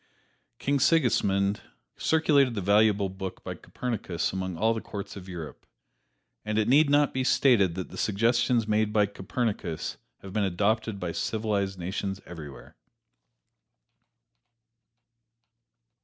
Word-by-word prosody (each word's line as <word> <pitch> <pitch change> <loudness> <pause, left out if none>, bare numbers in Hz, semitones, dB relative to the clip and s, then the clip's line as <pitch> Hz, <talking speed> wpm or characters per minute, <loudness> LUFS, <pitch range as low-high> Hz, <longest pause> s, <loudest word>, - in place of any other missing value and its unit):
King 140 0 0
Sigismund 100 - +2 0.3
circulated 145 -6 +3
this 100 - -3
valuable 105 0 +4
book 95 0 -7
by - - -4
Copernicus 110 -10 -3
among 95 -2 -3
all 110 +5 +2
the 110 - -4
courts 100 -1 -7
of 95 -2 -9
Europe, 85 -4 -8 0.8
and 105 0 -2
it 110 0 +2
need 140 +4 +5
not 145 0 +3
be 130 - 0
stated 115 -10 +3
that 95 -1 -5
the 90 - -8
suggestions 115 +2 +2
made 110 0 +1
by 105 -1 +3
Copernicus 100 -4 -3 0.3
have 95 -1 -9
been 105 -1 +1
adopted 105 +3 0
by 90 -2 -3
civilized 100 -1 -1
nations 95 +2 -3
everywhere. 75 -6 -10
105 Hz, 125 wpm, -27 LUFS, 95-115 Hz, 0.8 s, need